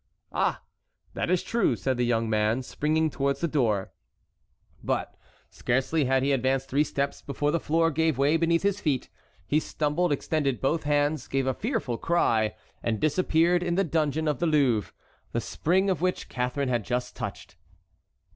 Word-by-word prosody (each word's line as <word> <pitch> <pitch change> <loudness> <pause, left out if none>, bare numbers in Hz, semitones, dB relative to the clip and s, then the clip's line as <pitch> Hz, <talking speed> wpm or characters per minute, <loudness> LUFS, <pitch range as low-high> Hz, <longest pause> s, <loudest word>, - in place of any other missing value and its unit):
"Ah! - - 0 0.5
that - - -2
is 180 -1 +2
true," 235 - +1
said 130 -1 -1
the 125 - 0
young 115 -1 +1
man, 110 +3 +1
springing 155 +4 0
towards 140 0 -1
the 170 - 0
door. 115 -11 0 0.9
But - - -2 0.4
scarcely 135 +5 0
had 130 0 +2
he 140 - +2
advanced 135 0 0
three 140 +3 +3
steps 140 -2 -2
before 145 +1 -1
the 170 - +1
floor 165 +1 +2
gave 160 -2 +1
way 140 +3 +3
beneath 165 +1 +2
his 200 0 0
feet. 140 -5 -1 0.4
He 150 +10 +2
stumbled, 155 +3 -1
extended 145 -2 0
both 150 +3 0
hands, 145 -1 +1
gave 135 -1 0
a 130 - +1
fearful 135 - -2
cry, 115 -11 +1 0.3
and 110 -2 -1
disappeared 170 - +2
in 175 -1 -1
the 195 - +3
dungeon 160 -2 0
of 150 -4 0
the 170 - +1
Louvre, 135 - +2 0.4
the - - +1
spring 190 +5 0
of 185 -4 0
which 180 0 -1
Catharine 125 +2 -1
had 120 -3 0
just 125 +2 -3
touched. - - -7
145 Hz, 170 wpm, -27 LUFS, 130-165 Hz, 0.9 s, three